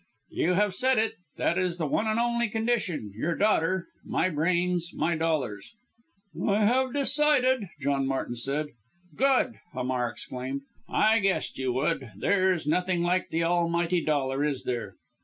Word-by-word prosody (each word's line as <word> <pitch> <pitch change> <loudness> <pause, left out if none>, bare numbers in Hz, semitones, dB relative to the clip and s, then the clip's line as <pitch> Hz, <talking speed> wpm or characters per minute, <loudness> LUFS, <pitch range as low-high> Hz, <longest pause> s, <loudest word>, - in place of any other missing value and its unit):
"You 180 - +1
have 205 0 +2
said 260 +5 +2
it 220 0 +1 0.2
that 170 - +1
is 180 -2 0
the 165 - -1
one 210 +9 0
and 220 +1 +1
only 235 -1 +1
condition. 220 - -1
Your 165 +10 -1
daughter 185 -4 +2 0.2
my 185 - 0
brains, 175 +2 0
my 170 +1 +1
dollars." 150 - -2 0.7
"I 210 +1 +2
have 255 +3 +2
decided!" 275 - +2
John 140 -1 0
Martin 135 -2 -2
said. 140 +5 -3 0.5
"Good!" 260 -2 +2
Hamar 125 -1 -1
exclaimed; 130 +4 -5 0.3
"I 220 +1 +4
guessed 195 -7 -1
you 130 -2 0
would! 130 -3 -1
There's 185 - +2
nothing 180 +3 +1
like 180 +1 +1
the 165 +1 0
almighty 170 0 +1
dollar, 140 -2 0
is 145 -3 -1
there?" 115 -6 -3
175 Hz, 150 wpm, -27 LUFS, 140-215 Hz, 0.7 s, I